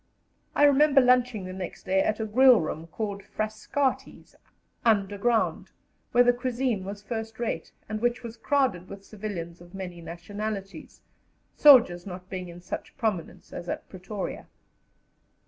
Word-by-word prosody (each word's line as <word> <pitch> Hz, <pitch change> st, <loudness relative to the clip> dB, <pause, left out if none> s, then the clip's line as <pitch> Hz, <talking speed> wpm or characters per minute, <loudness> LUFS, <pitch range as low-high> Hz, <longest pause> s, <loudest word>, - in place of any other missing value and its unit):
I -, -, +4 dB
remember 290 Hz, 0 st, +6 dB
lunching 250 Hz, -5 st, +3 dB
the 185 Hz, -, -6 dB
next 185 Hz, -1 st, -7 dB
day 190 Hz, 0 st, +2 dB
at 215 Hz, +2 st, 0 dB
a 220 Hz, -, -1 dB
grill 250 Hz, +2 st, +6 dB
room, 160 Hz, 0 st, -4 dB
called 200 Hz, +2 st, -4 dB
Frascati's, 215 Hz, +6 st, -3 dB, 0.5 s
underground, 215 Hz, +1 st, +1 dB, 0.4 s
where 245 Hz, -, +6 dB
the 245 Hz, 0 st, +5 dB
cuisine 245 Hz, -4 st, -1 dB
was 200 Hz, +1 st, -7 dB
first 225 Hz, -1 st, -5 dB
rate, 225 Hz, -9 st, -3 dB, 0.2 s
and 215 Hz, 0 st, -4 dB
which 240 Hz, +1 st, 0 dB
was 230 Hz, -1 st, -7 dB
crowded 230 Hz, -8 st, 0 dB
with 195 Hz, 0 st, -10 dB
civilians 180 Hz, -6 st, -6 dB
of 175 Hz, +2 st, -14 dB
many 180 Hz, -3 st, -7 dB
nationalities, 195 Hz, +4 st, -6 dB, 0.5 s
soldiers 225 Hz, -12 st, +6 dB
not 180 Hz, 0 st, -9 dB
being 185 Hz, -2 st, -5 dB
in 175 Hz, +1 st, -11 dB
such 180 Hz, -, -7 dB
prominence 215 Hz, -10 st, -3 dB
as 175 Hz, -, -6 dB
at -, -, -4 dB
Pretoria. 190 Hz, +2 st, -6 dB
210 Hz, 145 wpm, -27 LUFS, 185-240 Hz, 0.5 s, remember